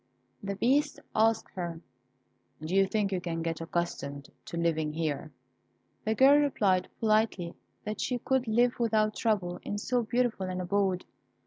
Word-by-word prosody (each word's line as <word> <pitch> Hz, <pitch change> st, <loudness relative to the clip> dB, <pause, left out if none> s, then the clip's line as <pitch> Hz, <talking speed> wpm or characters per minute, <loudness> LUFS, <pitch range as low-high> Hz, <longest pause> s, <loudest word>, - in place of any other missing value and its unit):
The 200 Hz, 0 st, -3 dB
Beast 280 Hz, +8 st, +2 dB, 0.2 s
asked 225 Hz, +1 st, +2 dB
her, 170 Hz, -3 st, -4 dB, 0.8 s
"Do 155 Hz, +3 st, -5 dB
you 195 Hz, 0 st, +4 dB
think 205 Hz, -1 st, 0 dB
you 185 Hz, -2 st, -1 dB
can 165 Hz, -2 st, -3 dB
get 165 Hz, 0 st, -3 dB
accustomed 165 Hz, -4 st, -3 dB, 0.2 s
to 170 Hz, -, -6 dB
living 160 Hz, -2 st, 0 dB
here?" 155 Hz, -1 st, -2 dB, 0.7 s
The 220 Hz, +1 st, +1 dB
girl 275 Hz, +5 st, +7 dB
replied, 205 Hz, -10 st, +2 dB
politely, 215 Hz, -5 st, +1 dB, 0.3 s
that 210 Hz, +1 st, -3 dB
she 250 Hz, -, 0 dB
could 260 Hz, 0 st, 0 dB
live 240 Hz, +3 st, +2 dB
without 215 Hz, -2 st, +2 dB
trouble 190 Hz, -6 st, 0 dB
in 205 Hz, -, -4 dB
so 245 Hz, +4 st, 0 dB
beautiful 235 Hz, -4 st, 0 dB
an 185 Hz, 0 st, -3 dB
abode. 185 Hz, 0 st, 0 dB
200 Hz, 150 wpm, -29 LUFS, 170-225 Hz, 0.8 s, girl